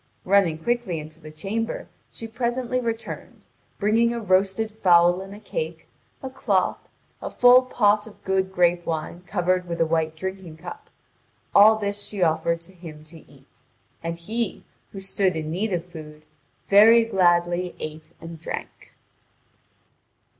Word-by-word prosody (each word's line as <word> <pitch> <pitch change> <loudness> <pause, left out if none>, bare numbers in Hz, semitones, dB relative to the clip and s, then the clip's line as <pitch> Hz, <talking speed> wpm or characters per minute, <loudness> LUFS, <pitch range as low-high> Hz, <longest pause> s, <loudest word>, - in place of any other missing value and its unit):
Running 185 -4 +3
quickly 240 -1 -1
into 155 +1 -9
the 155 -1 -11
chamber, 200 +9 -4 0.2
she 225 - -7
presently 240 +2 -2
returned, 230 -2 -5 0.3
bringing 225 +3 +2
a 235 - -3
roasted 195 +2 +1
fowl 175 -3 +4
and 195 0 -9
a - - -11
cake, 475 - -5 0.4
a 265 - -4
cloth, 205 -8 0 0.4
a - - -4
full 245 +1 +6
pot 215 -4 +2
of 215 - -16
good 190 0 0
grape 175 -1 +2
wine 165 +2 -4
covered 180 -1 0
with 170 -1 -4
a 165 - +4
white 160 -1 0
drinking 190 -1 -6
cup; 175 +2 -10 0.6
all 215 +2 +8
this 205 -1 -2
she 200 -3 -2
offered 170 +1 +1
to 180 +3 -14
him 160 -4 -11
to 160 +1 -13
eat. - - -23 0.4
And 165 0 -4
he, 220 +6 -3 0.3
who 195 - -8
stood 195 -1 0
in 155 -1 -4
need 200 +6 -2
of 175 -2 -2
food, 155 -3 -11 0.4
very 225 +3 +7
gladly 175 -3 +1
ate 155 0 -7
and 165 0 -9
drank. 160 - -8
185 Hz, 150 wpm, -24 LUFS, 170-215 Hz, 0.6 s, all